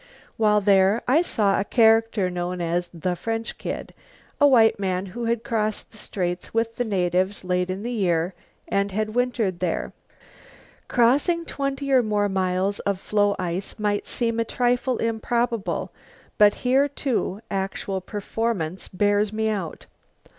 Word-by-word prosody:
While 210 -1 +3
there 195 +2 +4
I 280 +7 +5
saw 205 - +1
a - - +1
character 225 -3 +3
known 180 0 -3
as 175 +1 -1
the 180 +1 -2
French 225 +5 -4
Kid, - - -5 0.5
a 290 - +7
white 225 -6 +5
man 185 -1 -1
who 240 -1 -4
had 230 0 0
crossed 215 -2 -2
the 220 - -16
Straits 180 0 -4
with 230 0 0
the 245 - +1
natives 185 -2 0
late 180 0 0
in 190 +2 -4
the 240 - -3
year 180 -5 0 0.3
and 200 0 0
had 215 +2 -2
wintered 240 -7 0
there. 180 -3 -2 0.9
Crossing 285 +8 +2
twenty 275 -1 -3
or 260 -2 +6
more 210 -2 0
miles 190 +1 0
of 200 -2 -1
floe 205 0 +1
ice 180 +1 -4
might 205 -1 -1
seem 230 -1 -1
a - - +3
trifle 245 +1 0
improbable 230 -1 -1 0.5
but 205 -1 +6
here, 265 +3 +4
too, 260 -8 -2
actual 195 0 -2
performance 200 -3 -3
bears 205 +2 +1
me 220 0 0
out. 190 -7 -5
210 Hz, 150 wpm, -24 LUFS, 185-230 Hz, 0.9 s, a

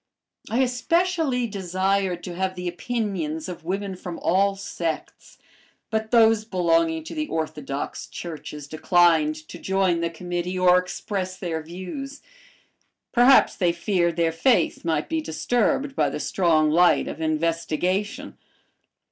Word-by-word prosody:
I 240 +4 +1
especially 285 +1 +1
desired 190 -2 -1
to 180 - -6
have 185 +1 -2
the 180 0 -5
opinions 175 -5 -3
of 180 -3 -7
women 195 +2 -3
from 180 -1 -7
all 195 +2 +2
sects, 170 -5 -5 0.5
but 220 0 -1
those 225 -2 +5
belonging 165 -5 +1
to - - -8
the 310 -1 -2
orthodox 150 - -4
churches 150 -3 -7
declined 160 0 +3
to - - -10
join 190 -3 +1
the 170 - 0
committee 175 +2 -4
or 180 0 +5
express 185 +1 -4
their 165 -3 -3
views. 185 - -7 0.9
Perhaps 250 +2 +5
they 175 -3 +2
feared 170 -2 0
their 165 -1 +2
faith 230 +10 +2
might 160 -3 0
be 320 0 -1
disturbed 245 - 0
by 145 - +2
the 140 - -4
strong 155 -3 +2
light 175 +3 +4
of - - -6
investigation. 165 +5 -1
180 Hz, 130 wpm, -24 LUFS, 165-205 Hz, 0.9 s, those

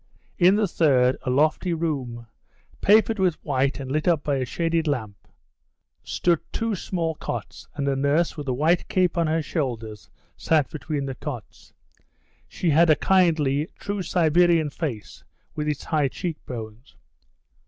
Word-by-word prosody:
In 185 +2 +6
the 210 -1 +2
third, 130 -7 +3
a - - +2
lofty 155 +6 +1
room, 135 -8 -3 0.6
papered 220 +1 +4
with 185 -4 +2
white 140 -1 0
and 130 -1 -6
lit 155 +3 -1
up 165 -4 +2
by 145 -2 0
a 130 - -1
shaded 165 +4 -1
lamp, 110 -9 -4 0.8
stood 170 -3 +1
two 225 -1 -1
small 170 -3 -2
cots, - - -6
and 140 - -2
a 140 - +1
nurse 140 +5 +1
with 145 -3 -7
a - - +1
white 160 +7 +1
cape 180 -2 +1
on 170 -2 +1
her 160 +1 0
shoulders 115 - -4 0.3
sat 155 -4 +1
between 150 -1 -3
the 135 - -4
cots. 125 - -8 0.8
She 170 - -1
had 165 +3 +5
a 155 - +7
kindly, 155 -6 +2
true 200 -1 -4
Siberian 170 -2 +3
face, 130 - -6 0.3
with 150 -1 -3
its 150 -2 -2
high 150 -4 +1
cheek 165 +3 -5
bones. 115 +1 -8
155 Hz, 155 wpm, -24 LUFS, 135-170 Hz, 0.8 s, a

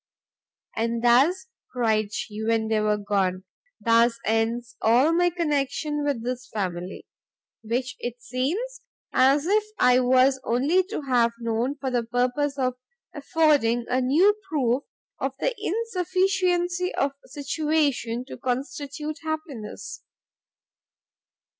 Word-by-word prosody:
"And 230 +1 -1
thus," 270 - +4 0.3
cried 220 -4 +1
she, 215 0 -5
when 225 0 +1
they 220 -1 +2
were 210 0 +1
gone, 195 -3 -1 0.4
"thus 230 0 +3
ends 230 +2 0
all 250 +8 +4
my 350 +1 +3
connection 295 -2 -1
with 280 -6 -1
this 250 +1 -4
family! 180 -3 -4 0.6
which 245 +3 -3
it 240 0 -5
seems 335 - -3 0.3
as 275 +3 +4
if 415 +4 +3
I 250 0 +5
was 260 +1 +3
only 280 +11 +2
to 370 - -5
have 240 -3 +2
known 230 +4 -1
for 275 -2 -4
the 245 -1 +1
purpose 250 +5 -1
of 255 -2 0 0.4
affording 285 -6 +2
a 255 +1 +1
new 320 +11 +4 0.2
proof 265 -3 0 0.3
of 270 0 -2
the - - 0
insufficiency 365 -4 0
of 275 - +1 0.2
situation 285 -4 -1
to - - -9
constitute 285 +4 -4
happiness. 310 -9 -6
255 Hz, 120 wpm, -25 LUFS, 230-310 Hz, 0.6 s, I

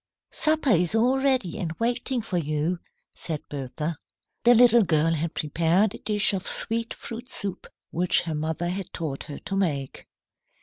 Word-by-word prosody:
"Supper 310 -4 +1
is 180 +1 +3
all 250 +4 +3
ready 255 -8 0
and 170 -5 -3
waiting 240 +4 -1
for 180 -5 -1
you," 155 +3 -1 0.3
said 155 -3 -6
Bertha. 145 +3 -4 0.5
The 240 +1 +6
little 240 0 +6
girl 165 -3 +2
had 165 +1 -2
prepared 170 +6 +1
a - - -9
dish 210 -1 +6
of 190 0 -3
sweet 230 +1 -2
fruit 235 +2 -8
soup 200 -6 -4 0.2
which 180 +1 +1
her 165 -2 -4
mother 160 +3 -2
had 190 0 -5
taught 150 -5 -4
her 145 -2 -7
to 195 - -5
make. 145 -9 -2
180 Hz, 165 wpm, -25 LUFS, 160-230 Hz, 0.5 s, The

